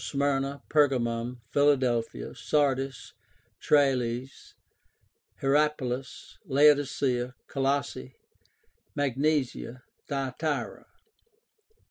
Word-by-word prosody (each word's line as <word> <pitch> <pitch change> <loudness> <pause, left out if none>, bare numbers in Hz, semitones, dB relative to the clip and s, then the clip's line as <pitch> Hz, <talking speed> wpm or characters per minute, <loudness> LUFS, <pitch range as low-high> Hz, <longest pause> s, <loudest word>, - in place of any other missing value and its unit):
Smyrna, 140 0 -1
Pergamum, 125 -4 +1
Philadelphia, 125 - +1
Sardis, 135 -3 -1 0.5
Tralles, 130 -3 0 0.9
Hierapolis, 135 -2 -1
Laodicea, 140 -3 +3
Colossae, 135 - -2 0.8
Magnesia, 140 -3 -1 0.2
Thyatira). 140 +2 -3
135 Hz, 50 wpm, -28 LUFS, 125-145 Hz, 0.9 s, Laodicea